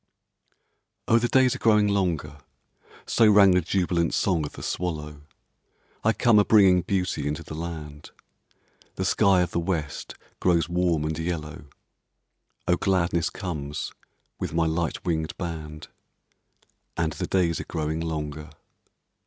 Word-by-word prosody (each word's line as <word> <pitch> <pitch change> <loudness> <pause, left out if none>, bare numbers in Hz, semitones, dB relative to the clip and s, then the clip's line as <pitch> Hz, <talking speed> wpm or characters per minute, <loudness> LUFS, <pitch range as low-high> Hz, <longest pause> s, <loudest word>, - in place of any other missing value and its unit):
Oh, 115 - +5
the 120 - 0
days 130 0 +4
are - - -7
growing 105 -2 +4
longer; 85 -8 -1 0.7
So 115 -2 +4
rang 100 -2 +7
the 90 0 +3
jubilant 85 -1 0
song 85 -6 +1
of - - -12
the - - -9
swallow; 75 -4 -4 0.8
I 115 - +4
come 110 +1 +4
a - - +5
bringing 95 -4 +5
beauty 90 -6 -1
into 75 +3 -3
the 75 - -9
land, 75 -2 -7 0.9
The 95 - -2
sky 95 -1 +3
of 90 -1 -1
the - - -1
West 85 -4 -3 0.2
grows 85 -3 +2
warm 85 -3 +1
and 80 0 -3
yellow, 80 -4 -4 1.0
Oh, 90 - +3
gladness 85 -3 +1
comes 75 -6 -5 0.5
with - - -4
my 85 -1 +2
light 80 +1 -2
winged 80 -2 -2
band, 75 -3 -6 1.1
And 80 -2 0
the - - -4
days 85 -3 +1
are - - -6
growing 80 -1 -3
longer. 75 -2 -4
85 Hz, 140 wpm, -25 LUFS, 80-95 Hz, 1.1 s, rang